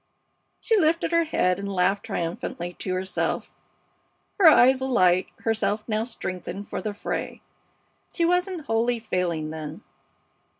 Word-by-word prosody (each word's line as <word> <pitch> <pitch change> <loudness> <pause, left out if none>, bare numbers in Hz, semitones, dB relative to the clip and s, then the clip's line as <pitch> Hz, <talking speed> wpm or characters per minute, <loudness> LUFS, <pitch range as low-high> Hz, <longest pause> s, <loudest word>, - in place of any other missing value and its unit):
She 455 - +1
lifted 330 0 +1
up - - +5
her - - +3
head 180 - +1
and 200 0 -4
laughed 195 +3 +1
triumphantly 175 -2 -4
to 185 - -3
herself, 185 +1 -2 0.9
her 370 - +7
eyes 260 -3 +6
alight, 185 -9 +3 0.2
herself 220 -1 0
now 215 0 0
strengthened 190 -4 -6
for - - -4
the 210 -1 -4
fray. - - -4 0.7
She 340 - 0
wasn't 360 -2 0
wholly 230 +2 +1
failing, 175 -8 -2
then? 160 +4 -7
210 Hz, 135 wpm, -25 LUFS, 180-260 Hz, 0.9 s, her